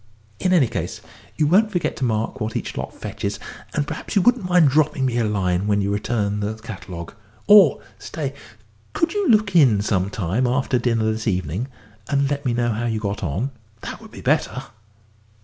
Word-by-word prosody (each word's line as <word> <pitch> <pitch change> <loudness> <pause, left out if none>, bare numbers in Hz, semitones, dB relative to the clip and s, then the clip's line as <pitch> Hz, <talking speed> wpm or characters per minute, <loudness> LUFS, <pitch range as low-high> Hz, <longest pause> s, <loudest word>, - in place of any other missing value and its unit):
In 185 - +1
any 170 -7 +5
case, 90 -7 -4 0.4
you 155 - +3
won't 205 +8 +4
forget 175 -4 -1
to - - -3
mark 115 +2 -1
what 110 +1 -3
each - - -3
lot - - -4
fetches, 105 -1 -5 0.4
and 150 - +1
perhaps - - -6
you 195 - +4
wouldn't 240 -5 +2
mind 175 -4 +5
dropping 150 -1 +2
me 120 -2 0
a - - +2
line 95 -3 0
when 105 -1 +2
you 100 0 0
return 105 -1 -1
the 105 +1 -2
catalogue 95 -6 -8 0.3
or 200 -8 +7 0.2
stay, 140 -4 -4 0.6
could 330 +2 0
you 410 -3 0
look 210 -4 +3
in 130 -11 +6
some 95 -2 0
time 105 +5 -1
after 130 0 +1
dinner 115 -2 +1
this 110 +1 -4
evening, 95 - -1 0.4
and 140 0 +1
let 145 0 -2
me - - +2
know 120 0 +1
how 115 +2 -2
you 110 -2 -1
got 105 -1 -3
on? 95 - -2 0.3
that - - -7
would - - -12
be - - -11
better." - - 0
120 Hz, 195 wpm, -22 LUFS, 105-150 Hz, 0.6 s, or